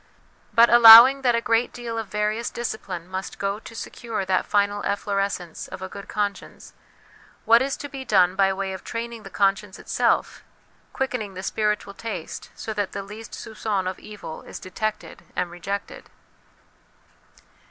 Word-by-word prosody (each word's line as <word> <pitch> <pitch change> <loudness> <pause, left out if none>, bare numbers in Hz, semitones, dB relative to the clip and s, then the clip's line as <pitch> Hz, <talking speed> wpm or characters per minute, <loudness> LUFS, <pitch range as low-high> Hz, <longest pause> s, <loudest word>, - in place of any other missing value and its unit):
But 235 +1 +6
allowing 240 +3 +10
that 245 -3 +3
a 235 - +1
great 230 +1 +2
deal 235 -1 -6
of 220 - -5
various 210 +3 -1
discipline 195 -7 -5
must 190 +1 -6
go 200 +1 -2
to 225 - -12
secure 225 -3 -5
that 185 0 0
final 205 0 +1
efflorescence 200 -4 -2
of 190 - -8
a - - -4
good 200 +1 -10
conscience, 205 -2 -4 0.7
what 230 +1 +6
is 270 +1 -1
to 285 - -6
be 270 -2 -7
done 185 -6 +3
by 195 0 +3
way 190 0 -3
of 190 - -8
training 230 0 -5
the 195 - -10
conscience 195 0 0
itself, - - 0 0.5
quickening 245 -7 -3
the 185 - -6
spiritual 210 -1 -1
taste 225 +2 -7
so 220 - -5
that 205 -2 -3
the 200 - -4
least 215 +3 -10
soup^on 210 -4 -3
of 185 - -4
evil 205 -7 -9
is - - -9
detected 215 +4 -5
and 180 -1 -2
rejected 195 +3 -6
210 Hz, 160 wpm, -24 LUFS, 195-230 Hz, 0.7 s, allowing